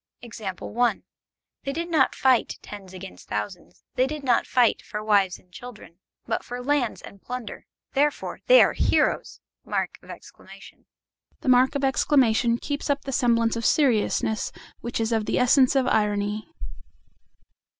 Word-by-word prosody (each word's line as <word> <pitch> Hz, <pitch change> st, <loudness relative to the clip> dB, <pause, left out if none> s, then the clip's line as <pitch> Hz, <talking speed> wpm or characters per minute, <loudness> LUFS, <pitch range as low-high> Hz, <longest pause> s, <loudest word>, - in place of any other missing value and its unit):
They 230 Hz, +4 st, -5 dB
did 335 Hz, +3 st, -4 dB
not 275 Hz, -6 st, +3 dB
fight, 260 Hz, -3 st, +2 dB
tens 200 Hz, -3 st, -10 dB
against 175 Hz, -, -11 dB
thousands; 105 Hz, -, -6 dB
they 255 Hz, +1 st, +2 dB
did 300 Hz, 0 st, -6 dB
not 245 Hz, -3 st, +2 dB
fight 245 Hz, -3 st, +3 dB
for 210 Hz, 0 st, -6 dB
wives 200 Hz, -3 st, +2 dB
and 180 Hz, -, -27 dB
children, 210 Hz, -5 st, -12 dB, 0.3 s
but -, -, -2 dB
for 245 Hz, +1 st, -6 dB
lands 280 Hz, -4 st, 0 dB
and 200 Hz, -, -12 dB
plunder: 250 Hz, -2 st, -7 dB, 0.3 s
therefore 290 Hz, +2 st, 0 dB
they -, -, +8 dB
are -, -, +1 dB
heroes! -, -, 0 dB, 0.2 s
The -, -, -21 dB, 1.7 s
mark 255 Hz, +2 st, +4 dB
of 280 Hz, -, -2 dB
exclamation 245 Hz, -4 st, +3 dB
keeps 285 Hz, +3 st, -4 dB
up 285 Hz, 0 st, 0 dB
the 270 Hz, -, -5 dB
semblance 235 Hz, -3 st, +2 dB
of 230 Hz, -, -4 dB
seriousness 220 Hz, -5 st, +1 dB, 0.3 s
which 235 Hz, 0 st, -4 dB
is 225 Hz, 0 st, -1 dB
of 220 Hz, -2 st, 0 dB
the -, -, 0 dB
essence 255 Hz, +1 st, +4 dB
of 265 Hz, -1 st, +3 dB
irony. 210 Hz, -1 st, 0 dB
240 Hz, 140 wpm, -25 LUFS, 210-265 Hz, 1.7 s, they